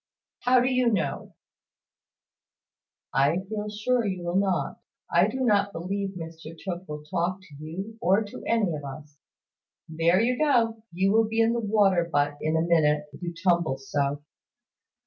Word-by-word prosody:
"How 250 Hz, 0 st, +4 dB
do 250 Hz, -, +2 dB
you 255 Hz, -2 st, +2 dB
know?" 205 Hz, -, -2 dB, 1.8 s
"I 140 Hz, +5 st, +3 dB
feel 210 Hz, 0 st, -4 dB
sure 230 Hz, +4 st, 0 dB
you 185 Hz, -4 st, -3 dB
will 175 Hz, +1 st, -2 dB
not. 190 Hz, -2 st, 0 dB, 0.3 s
I 175 Hz, +3 st, +5 dB
do 260 Hz, +5 st, -4 dB
not 205 Hz, -4 st, +3 dB
believe 195 Hz, +3 st, -3 dB
Mr 165 Hz, -1 st, -9 dB
Tooke 185 Hz, 0 st, -6 dB
will 150 Hz, 0 st, -6 dB
talk 175 Hz, +4 st, -2 dB
to 175 Hz, -6 st, -15 dB
you, 195 Hz, +8 st, -7 dB
or 200 Hz, 0 st, +3 dB
to 205 Hz, -, -9 dB
any 215 Hz, -7 st, +2 dB
of 150 Hz, -1 st, -5 dB
us. 145 Hz, +1 st, -10 dB, 0.7 s
There 165 Hz, +3 st, +2 dB
you 245 Hz, +4 st, +1 dB
go! 235 Hz, -7 st, +2 dB
You 190 Hz, +3 st, +1 dB
will 225 Hz, +1 st, +4 dB
be 225 Hz, +1 st, -2 dB
in 225 Hz, +1 st, +4 dB
the 235 Hz, -, 0 dB
water 200 Hz, -5 st, +3 dB
butt 145 Hz, 0 st, +1 dB
in 155 Hz, +1 st, +1 dB
a -, -, +2 dB
minute, 150 Hz, -3 st, +2 dB
if -, -, -12 dB
you 175 Hz, -1 st, -3 dB
tumble 170 Hz, -4 st, +1 dB
so." 140 Hz, +1 st, -2 dB
185 Hz, 165 wpm, -26 LUFS, 160-215 Hz, 1.8 s, I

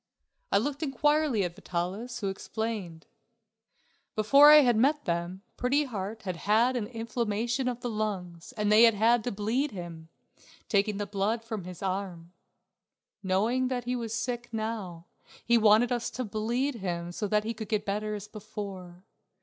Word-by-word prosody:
I -, -, +5 dB
looked 280 Hz, +7 st, -2 dB
inquiringly 295 Hz, -4 st, +2 dB
at 175 Hz, -2 st, -3 dB
Vitalis, 195 Hz, +10 st, -4 dB
who 200 Hz, -, -1 dB
explained: 195 Hz, -4 st, -5 dB, 1.1 s
Before 275 Hz, +8 st, +7 dB
I 300 Hz, 0 st, +10 dB
had 245 Hz, -4 st, +3 dB
met 285 Hz, +6 st, +2 dB
them 175 Hz, +2 st, -3 dB
Pretty 275 Hz, +4 st, +2 dB
Heart 220 Hz, -4 st, -5 dB
had 185 Hz, -3 st, -4 dB
had 225 Hz, +7 st, +2 dB
inflammation 230 Hz, +1 st, -2 dB
of 245 Hz, -1 st, -3 dB
the 245 Hz, -, -3 dB
lungs 185 Hz, -6 st, -4 dB
and 210 Hz, -1 st, 0 dB
they 215 Hz, +1 st, +7 dB
had 230 Hz, -2 st, +4 dB
had 225 Hz, +2 st, +3 dB
to 245 Hz, -, -1 dB
bleed 225 Hz, +8 st, -1 dB
him, 170 Hz, -6 st, -8 dB, 0.6 s
taking 205 Hz, 0 st, +1 dB
the 205 Hz, -, -2 dB
blood 205 Hz, +3 st, -1 dB
from 220 Hz, -5 st, -5 dB
his 180 Hz, 0 st, -8 dB
arm. 185 Hz, -3 st, -4 dB, 0.9 s
Knowing 215 Hz, +7 st, +1 dB
that 250 Hz, -1 st, -2 dB
he 250 Hz, +1 st, -2 dB
was 230 Hz, -3 st, -4 dB
sick 240 Hz, +1 st, -3 dB
now 215 Hz, -7 st, -4 dB, 0.4 s
he 235 Hz, -, +4 dB
wanted 225 Hz, +2 st, +5 dB
us 240 Hz, -1 st, -1 dB
to 255 Hz, -, -4 dB
bleed 235 Hz, +7 st, -1 dB
him 175 Hz, -3 st, -4 dB
so 210 Hz, +4 st, -3 dB
that 210 Hz, +1 st, +1 dB
he 225 Hz, +2 st, -3 dB
could 220 Hz, -1 st, -8 dB
get 215 Hz, -2 st, 0 dB
better 210 Hz, +1 st, -2 dB
as 205 Hz, 0 st, -7 dB
before. 195 Hz, -4 st, -8 dB
215 Hz, 165 wpm, -28 LUFS, 195-240 Hz, 1.1 s, I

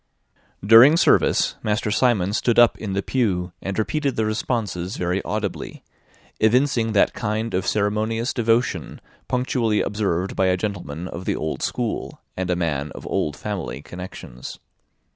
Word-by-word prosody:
During 120 Hz, +9 st, +8 dB
service, -, -, +3 dB
Master 105 Hz, +1 st, -1 dB
Simon 105 Hz, -5 st, +2 dB
stood 120 Hz, +2 st, +1 dB
up 120 Hz, -1 st, +6 dB
in 105 Hz, -3 st, -4 dB
the 100 Hz, 0 st, -1 dB
pew, 95 Hz, -8 st, 0 dB
and 95 Hz, 0 st, -4 dB
repeated 135 Hz, +6 st, -1 dB
the 110 Hz, -, 0 dB
responses 110 Hz, -4 st, -2 dB
very 90 Hz, +2 st, -1 dB
audibly; 105 Hz, -3 st, -4 dB, 0.6 s
evincing 115 Hz, 0 st, +2 dB
that 100 Hz, -, +3 dB
kind 110 Hz, +1 st, -2 dB
of 90 Hz, -, -1 dB
ceremonious 110 Hz, +3 st, 0 dB
devotion 115 Hz, +1 st, 0 dB, 0.3 s
punctually 125 Hz, -4 st, 0 dB
observed 95 Hz, -3 st, -1 dB
by 95 Hz, -, +2 dB
a 90 Hz, 0 st, +2 dB
gentleman 90 Hz, -5 st, -4 dB
of 90 Hz, 0 st, -7 dB
the -, -, 0 dB
old 80 Hz, 0 st, -3 dB
school, -, -, -3 dB, 0.2 s
and 95 Hz, -1 st, -3 dB
a 90 Hz, -, +2 dB
man 75 Hz, -4 st, -2 dB
of -, -, -9 dB
old 75 Hz, -1 st, -1 dB
family 95 Hz, -9 st, -5 dB
connections. 90 Hz, -9 st, -9 dB
105 Hz, 145 wpm, -22 LUFS, 90-115 Hz, 0.6 s, During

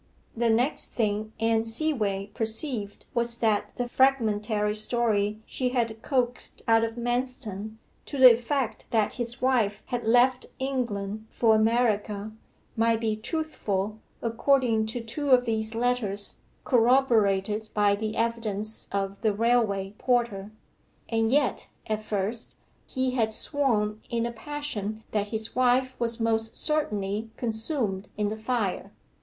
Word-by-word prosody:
The 235 Hz, 0 st, +1 dB
next 240 Hz, +6 st, +1 dB
thing 215 Hz, -1 st, -1 dB
Anne 225 Hz, 0 st, +2 dB
Seaway 225 Hz, -6 st, -1 dB
perceived 225 Hz, -1 st, -1 dB
was 235 Hz, -1 st, +1 dB
that 220 Hz, -3 st, 0 dB
the 245 Hz, -, -2 dB
fragmentary 215 Hz, -5 st, +2 dB
story 215 Hz, -1 st, 0 dB
she 255 Hz, -1 st, -2 dB
had 230 Hz, -3 st, -1 dB
coaxed 245 Hz, -3 st, -2 dB
out 225 Hz, 0 st, +5 dB
of 225 Hz, 0 st, -2 dB
Manston, 240 Hz, -4 st, -3 dB, 0.3 s
to 285 Hz, -, -5 dB
the 255 Hz, -2 st, +10 dB
effect 245 Hz, +1 st, -2 dB
that 220 Hz, -3 st, +1 dB
his 240 Hz, 0 st, -4 dB
wife 230 Hz, -6 st, +2 dB
had 240 Hz, -2 st, -3 dB
left 245 Hz, +2 st, +4 dB
England 220 Hz, -6 st, -3 dB
for 225 Hz, -2 st, +3 dB
America, 215 Hz, -2 st, +1 dB, 0.4 s
might 230 Hz, 0 st, +2 dB
be 220 Hz, -2 st, 0 dB
truthful, 215 Hz, -, -2 dB, 0.2 s
according 230 Hz, -1 st, +2 dB
to 235 Hz, +2 st, -4 dB
two 260 Hz, +6 st, -4 dB
of 250 Hz, -1 st, +6 dB
these 220 Hz, -1 st, -1 dB
letters, 225 Hz, -4 st, 0 dB, 0.3 s
corroborated 220 Hz, -5 st, +3 dB
by 205 Hz, -1 st, +4 dB
the 215 Hz, +1 st, -3 dB
evidence 225 Hz, -2 st, -2 dB
of 195 Hz, 0 st, -2 dB
the 220 Hz, -2 st, +2 dB
railway 210 Hz, -3 st, +1 dB
porter. 235 Hz, -6 st, 0 dB, 0.6 s
And 225 Hz, 0 st, +1 dB
yet, 285 Hz, 0 st, +1 dB, 0.2 s
at 215 Hz, 0 st, -2 dB
first, 215 Hz, +2 st, -3 dB, 0.3 s
he 260 Hz, 0 st, 0 dB
had 225 Hz, -4 st, +1 dB
sworn 220 Hz, -5 st, 0 dB
in 235 Hz, -1 st, 0 dB
a 235 Hz, -, -2 dB
passion 230 Hz, -5 st, -5 dB
that 210 Hz, -1 st, 0 dB
his 220 Hz, +1 st, -3 dB
wife 255 Hz, +1 st, +2 dB
was 235 Hz, 0 st, 0 dB
most 225 Hz, -1 st, 0 dB
certainly 215 Hz, -8 st, 0 dB
consumed 220 Hz, -4 st, -2 dB
in 210 Hz, -1 st, 0 dB
the 215 Hz, -, -3 dB
fire. 220 Hz, -3 st, -2 dB
225 Hz, 135 wpm, -27 LUFS, 210-245 Hz, 0.6 s, the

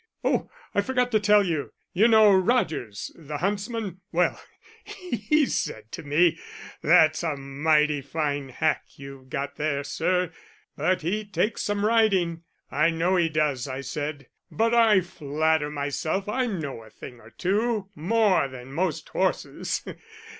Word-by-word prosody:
Oh, -, -, 0 dB, 0.2 s
I 200 Hz, -, +3 dB
forgot 250 Hz, +2 st, 0 dB
to 215 Hz, -, +3 dB
tell 210 Hz, 0 st, +5 dB
you 165 Hz, -6 st, -2 dB, 0.2 s
you 210 Hz, +6 st, +5 dB
know 220 Hz, -3 st, +6 dB
Rodgers, 180 Hz, -, 0 dB
the 150 Hz, -2 st, -7 dB
huntsman, 200 Hz, +1 st, -3 dB
well, 175 Hz, +1 st, +1 dB, 0.4 s
he 305 Hz, -, 0 dB
said 110 Hz, -, -3 dB
to -, -, -6 dB
me, 160 Hz, +3 st, +2 dB, 0.4 s
'That's 155 Hz, -1 st, +5 dB
a 160 Hz, -4 st, -2 dB
mighty 150 Hz, +2 st, +1 dB
fine 145 Hz, -1 st, -2 dB
hack 155 Hz, +4 st, 0 dB
you've 135 Hz, -1 st, -11 dB
got 140 Hz, 0 st, -4 dB
there, 145 Hz, -2 st, -1 dB
sir, 180 Hz, +4 st, 0 dB, 0.4 s
but 185 Hz, -3 st, 0 dB
he 205 Hz, +6 st, -1 dB
takes 210 Hz, +1 st, -1 dB
some 205 Hz, 0 st, -1 dB
riding.' 195 Hz, -7 st, +2 dB, 0.3 s
'I 155 Hz, +4 st, +3 dB
know 170 Hz, +3 st, +1 dB
he 170 Hz, -2 st, +2 dB
does,' 150 Hz, -4 st, 0 dB
I 130 Hz, 0 st, -4 dB
said; 145 Hz, +1 st, -5 dB, 0.2 s
'but 230 Hz, +1 st, +1 dB
I 225 Hz, -5 st, +5 dB
flatter 155 Hz, -2 st, 0 dB
myself 150 Hz, +6 st, -2 dB
I 250 Hz, +4 st, 0 dB
know 155 Hz, -, -4 dB
a 110 Hz, -, -14 dB
thing 120 Hz, +3 st, -11 dB
or 110 Hz, -, -15 dB
two 205 Hz, -, -1 dB
more 190 Hz, -1 st, +2 dB
than 130 Hz, 0 st, -10 dB
most 185 Hz, +5 st, -2 dB
horses. -, -, -1 dB
165 Hz, 145 wpm, -25 LUFS, 145-205 Hz, 0.4 s, know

